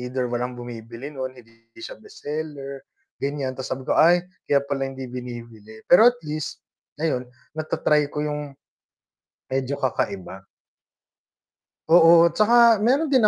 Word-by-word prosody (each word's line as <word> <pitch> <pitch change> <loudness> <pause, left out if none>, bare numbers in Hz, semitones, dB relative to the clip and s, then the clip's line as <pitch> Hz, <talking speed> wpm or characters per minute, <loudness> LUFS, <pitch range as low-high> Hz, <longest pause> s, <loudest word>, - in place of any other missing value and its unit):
either 125 0 -3
walang 125 +1 -2
bumibili 120 +2 -8
nun, 130 -2 -5
hindi 115 -1 -19 0.2
siya - - -8
best - - -15
seller, 145 -2 -5 0.4
ganyan. 140 -2 -3
Tapos 130 - -5
sabi 130 - -4
ko, - - +3
"Ay, 175 +2 +5 0.2
kaya 140 -1 +3
pala 135 -1 -1
hindi 135 0 -7
binibili." 115 -3 -9
Pero 180 +6 +7
at 245 - -18
least, 155 0 -5 0.4
ayon, 140 -6 0 0.3
nata-try 150 -1 +1
ko 150 - -3
yung 150 -1 -4 1.0
medyo 135 +1 -2
kakaiba. 95 -6 -3 1.5
Oo, 170 0 +7
tsaka 230 +3 +5
meron 270 +8 +2
din 250 -6 +5
140 Hz, 135 wpm, -23 LUFS, 125-160 Hz, 1.5 s, Pero